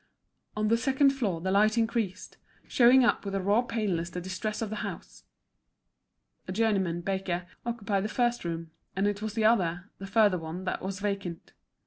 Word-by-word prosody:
On 215 0 +1
the 230 - +4
second 270 +3 +3
floor 210 -12 -2
the 190 +2 -1
light 215 +3 +4
increased, 225 -4 -1 0.3
showing 250 +1 +6
up - - +2
with 200 -1 -4
a - - +1
raw 200 +5 +3
paleness 205 -8 -2
the 180 - -5
distress 190 +4 -4
of 215 - -4
the 215 - -3
house. - - -7 1.2
A - - -4
journeyman 190 -7 +1
baker 185 -1 -2 0.2
occupied 205 -4 -1
the - - -2
first 240 +1 0
room, 165 -1 -4 0.2
and 195 +2 +1
it 205 0 0
was 220 0 -4
the 220 -2 +1
other, 180 -4 +2
the 195 - -7
further 205 -2 +3
one, 165 +3 -6
that 185 - -2
was 190 0 -4
vacant. 195 -5 -4
200 Hz, 180 wpm, -29 LUFS, 185-225 Hz, 1.2 s, showing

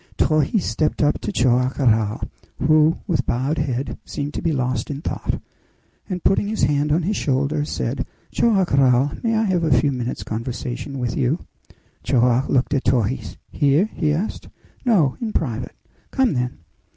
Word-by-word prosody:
Torres 155 +6 +2
stepped 155 0 0
up 145 - +1
to 105 - -3
Joam 125 +2 +2
Garral, 110 -5 +2 0.3
who, 155 +1 +4
with 175 -6 0
bowed 135 +6 0
head, 130 -3 -2
seemed 145 0 -5
to - - -3
be 165 - +1
lost 130 -4 -1
in 140 -1 -4
thought, - - -3 0.7
and 180 -2 -4
putting 200 - +2
his 215 +1 -2
hand 145 0 +2
on 160 +3 +2
his 205 +5 0
shoulder, 140 +2 0
said, - - -3 0.2
"Joam 215 -5 +3
Garral, 135 -3 +3
may 230 -1 +1
I 220 - +2
have 185 -5 +1
a 145 -6 +4
few 140 +3 +1
minutes' 125 -2 -3
conversation 120 +4 -4
with 125 -2 -2
you?" 135 +7 0 0.6
Joam 125 +1 +2
looked 130 +2 +1
at 140 - 0
Torres. 120 0 0
"Here?" 150 +8 +2
he 155 -3 0
asked. 175 +8 -3 0.3
"No; 185 - +3
in 225 -2 -3
private." 125 -5 -2 0.3
"Come, 265 - +2
then." 125 -1 -2
140 Hz, 165 wpm, -22 LUFS, 125-160 Hz, 0.7 s, who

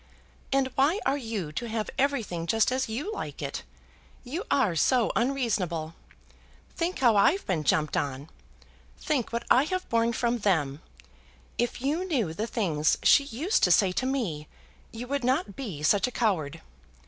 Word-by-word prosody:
"And 270 -1 +2
why 295 +9 +2
are 270 - +2
you 225 - -4
to 235 +10 -4
have 220 -1 -3
everything 230 -12 -1
just 225 +6 +2
as 260 -2 -1
you 290 - -3
like - - -6
it? - - -4 0.6
You 305 - -5
are 220 -11 +2
so 240 - +3
unreasonable. 210 - -1 0.8
Think 350 +2 -1
how 240 -4 +4
I've 330 - +3
been 170 -5 -1
jumped 150 0 +1
on! 140 +1 -2 0.7
Think 280 -7 -1
what 235 0 -3
I 260 +3 +6
have 370 +3 -3
borne 230 0 +2
from 240 0 0
them! 160 -8 0 0.8
If 240 +1 -1
you 305 +6 0
knew 255 - -1
the 215 +7 -3
things 160 -10 +1
she 280 - +6
used 290 - 0
to - - +4
say 185 +2 +5
to 255 +8 -1
me, 190 - -2 0.4
you 230 +2 -6
would 280 0 -2
not 255 - 0
be 195 - -6
such 195 +7 +3
a - - -5
coward. 185 - -1
230 Hz, 165 wpm, -27 LUFS, 180-270 Hz, 0.8 s, I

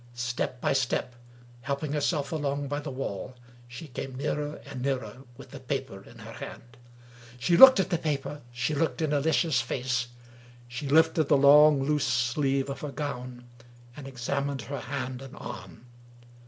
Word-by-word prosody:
Step 120 +1 -3
by - - +1
step, 130 -1 0 0.5
helping 140 +3 -3
herself 145 -1 0
along 145 -2 -2
by 145 +1 -2
the 150 0 -6
wall, 130 -3 -5 0.3
she 120 +7 -9
came 130 0 -6
nearer 150 +2 -2
and 140 -2 -7
nearer, 130 -1 -2 0.2
with 135 - -13
the 140 - -8
paper 130 -7 -4
in - - -15
her - - -10
hand. 120 +1 -10 0.6
She 170 +8 +2
looked 260 +4 +10
at 190 0 0
the 170 - +1
paper 145 -2 -3
— - - -22
she 120 +5 -2
looked 160 +2 0
in 150 -1 0
Alicia's 150 -2 +2
face 125 0 -2 0.3
— 120 0 -23
she 125 +4 -6
lifted 160 +1 +4
the 145 +1 +4
long, 145 0 +7
loose 145 0 +1
sleeve 135 +2 +1
of 140 - -6
her 150 - -4
gown, 125 -4 -6 0.5
and 145 -2 -9
examined 135 +1 -3
her 140 +2 -5
hand 130 -2 -5
and 135 -1 -10
arm. - - -9
140 Hz, 170 wpm, -28 LUFS, 125-150 Hz, 0.6 s, looked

